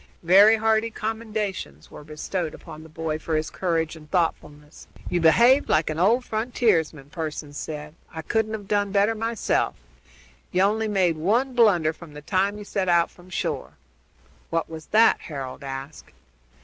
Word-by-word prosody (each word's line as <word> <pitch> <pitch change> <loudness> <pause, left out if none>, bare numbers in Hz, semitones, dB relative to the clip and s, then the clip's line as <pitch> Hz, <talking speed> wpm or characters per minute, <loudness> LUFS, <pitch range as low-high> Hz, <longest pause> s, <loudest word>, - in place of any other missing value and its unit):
Very 200 +6 +7
hearty 220 0 +2
were 225 - -11
the - - -10
commendations 215 - -4 0.2
bestowed 155 +2 -4
on 155 -3 -10
the 160 - -13
boy 155 0 -3
for 160 0 -2
his 155 0 -2
courage 165 -3 -1
and 150 -1 -14
thoughtfulness. 150 -4 -3 0.2
"You 175 -1 +1
behaved 235 - +5
like 155 0 +2
an 155 - -4
old 230 +8 +3
frontiersman," 210 - 0
Pearson 155 -3 -5
said. 150 0 -6 0.2
"I 160 -1 -7
couldn't 220 +3 -1
have 205 -2 -6
done 205 -1 0
better 205 +2 +3
myself. 225 0 -1 0.8
You 185 +1 +2
only 220 +2 +1
made 185 -6 +1
one 235 +11 +1
blunder 190 -10 +4
from 165 -2 -13
the 150 - -8
time 195 +4 0
you 210 - -8
set 190 -2 -2
out 170 -1 +3
from 180 +1 -18
shore." 70 - -3 0.8
"What 165 0 -1
was 160 -1 -9
that?" 225 +2 +4
Harold 135 -4 -7
asked. 135 - -8
175 Hz, 165 wpm, -24 LUFS, 155-215 Hz, 0.8 s, Very